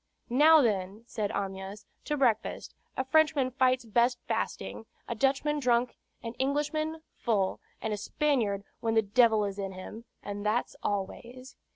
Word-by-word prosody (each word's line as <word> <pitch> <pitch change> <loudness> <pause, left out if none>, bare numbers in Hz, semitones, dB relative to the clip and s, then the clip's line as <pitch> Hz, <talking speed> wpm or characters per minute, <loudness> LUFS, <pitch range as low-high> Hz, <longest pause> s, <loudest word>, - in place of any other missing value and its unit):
"Now, 305 +4 +7
then," 200 -1 -1
said 215 -4 -3
Amyas, 195 +1 -5 0.2
"to 295 - -1
breakfast. 235 -6 0 0.2
A 260 - 0
Frenchman 300 -2 +3
fights 255 -1 +2
best 240 +3 +2
fasting, 110 - -3 0.2
a - - -2
Dutchman 275 +5 +1
drunk, 245 -2 +2 0.3
an 230 -1 -5
Englishman 310 +3 -1
full, 200 -5 0 0.2
and 220 - -1
a - - -2
Spaniard 220 -6 0 0.2
when 225 -1 0
the 220 - +5
devil 220 0 +4
is 200 0 -5
in 195 -1 -3
him, 210 +5 -9 0.2
and 205 0 -5
that's 215 +3 0
always." 240 +6 -4
235 Hz, 150 wpm, -29 LUFS, 205-265 Hz, 0.3 s, Now